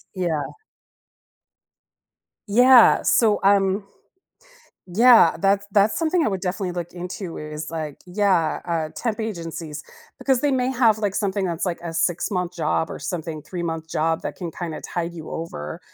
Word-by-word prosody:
Yeah. 165 -5 -2 1.9
Yeah, 245 +3 +6
so, 220 -3 +3
um, 195 0 +3 1.1
yeah, 230 -4 +6
that's 200 +2 +1
that's 205 +1 +3
something 330 0 +1
I - - +2
would 190 -3 -3
definitely 185 0 -3
look 175 -1 -5
into 180 0 -6
is 150 +1 -6
like, 155 -3 -5
yeah, 185 -3 +1
uh, 165 -3 -1
temp 230 -2 -2
agencies, 165 -7 -5 0.4
because 265 -3 +1
they 290 - +1
may 255 -1 +1
have 230 -4 +3
like 205 -3 -1
something 200 -1 -1
that's 175 0 -2
like 175 - -2
a 170 -1 -5
six-month 180 +2 -1
job 160 0 0
or - - -6
something 160 -3 -5
three-month 165 -3 -5
job 160 +1 0
that - - -5
can 175 -3 -5
kinda 165 -1 -6
tide 170 0 -4
you 160 -2 -9
over 120 - -6
180 Hz, 150 wpm, -23 LUFS, 165-205 Hz, 1.9 s, Yeah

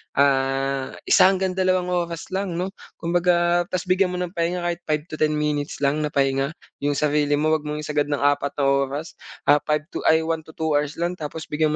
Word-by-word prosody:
ah, 135 -1 +1
1 - - +6
hanggang 190 -1 +1
2 185 -1 +1
oras 170 -1 -3
lang 190 -2 -2
'no, 185 +3 -2 0.2
kumbaga 175 0 +2
tas 185 -1 -2
bigyan 185 +1 +2
mo 180 - -4
ng 180 -1 -3
pahinga 175 0 -1
kahit 175 -1 -1
5-10 155 0 0
minutes 150 -1 -2
lang 140 +2 +2
na 150 - 0
pahinga 135 +1 0 0.2
yung 145 0 0
sarili 145 0 +2
mo, 155 +2 +1
huwag 155 -1 0
mong 150 0 -3
isagad 150 -1 0
ng 145 -1 -1
4 145 0 +1
na 145 - -1
oras, 140 +3 -2 0.2
ah, 145 +1 +5
5 150 0 +1
to - - -4
ay, 160 0 +5
1-2 160 -1 -3
hours 145 0 0
lang 175 +2 -2
tapos 155 +1 -5
bigyan 155 0 0
155 Hz, 195 wpm, -23 LUFS, 145-175 Hz, 0.2 s, 1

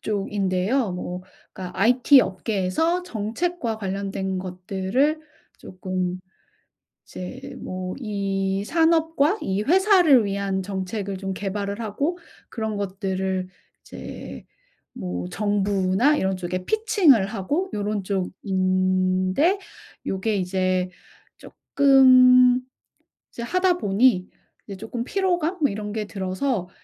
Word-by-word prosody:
쪽인데요. 200 +2 -1
뭐 180 0 -5 0.3
그러니까 185 -1 -8
IT 250 +5 +6
업계에서 220 - -1
정책과 230 - -3
관련된 195 -1 -3
것들을 190 - -1 0.4
쪼끔 185 -1 -4 0.9
이제 265 +9 -8
뭐 185 0 -5
이 195 -3 -2
산업과 325 - +2
이 195 +2 -1
회사를 355 - +5
위한 195 -1 -2
정책을 195 +1 -4
좀 195 0 -4
개발을 200 +1 -4
하고 280 - -2 0.3
그런 220 -3 -3
것들을 190 -1 -2 0.3
이제 - - -9 0.5
뭐 90 -1 -5
정부나 205 - +1
이런 190 0 0
쪽에 180 0 -4
피칭을 375 - +3
하고 280 - -2
요런 205 -1 -2
쪽인데 185 - 0 0.5
요게 200 +3 -1
이제 185 0 0 0.5
쪼끔 255 -2 +5 0.7
이제 235 - -7
하다 365 +5 +1
보니 200 - +2 0.4
이제 195 -2 -7
쪼끔 225 +3 -5
피로감 360 +1 -1
뭐 285 - +4
이런 210 0 -5
게 215 -1 -3
들어서 190 +1 -2
200 Hz, 220 characters per minute, -23 LUFS, 185-260 Hz, 0.9 s, IT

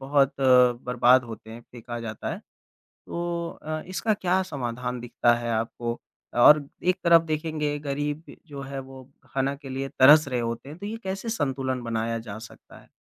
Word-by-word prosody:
बहुत 135 0 +2
बर्बाद 125 -1 +4
होते 110 -1 -10
हैं, 115 +1 -9
फेंका 120 0 -7
जाता 110 -2 -5
है। - - -8 0.7
तो 170 0 -3
अ, 155 0 -3
इसका 210 +4 0
क्या 190 -1 +1
समाधान 125 -6 -4
दिखता 120 0 +2
है 120 0 -3
आपको? 115 +1 -3 0.3
और 145 +4 +7 0.2
एक 185 +1 +2
तरफ 170 -1 +7
देखेंगे 155 -2 -2
गरीब 145 +2 -4
जो 140 -2 -8
है, 135 0 -6
वो 130 0 -10 0.2
खाना 135 +1 -1
के 140 -1 -11
लिए 135 +1 -3
तरस 145 +3 +6
रहे 125 -2 -1
होते 115 +5 -4
तो 200 +4 -8
ये 220 +2 -4
कैसे 190 +4 -4
संतुलन 135 - -1
बनाया 115 0 -2
जा 110 -2 -8
सकता 110 0 -13
है? - - -22
135 Hz, 170 wpm, -26 LUFS, 120-155 Hz, 0.7 s, और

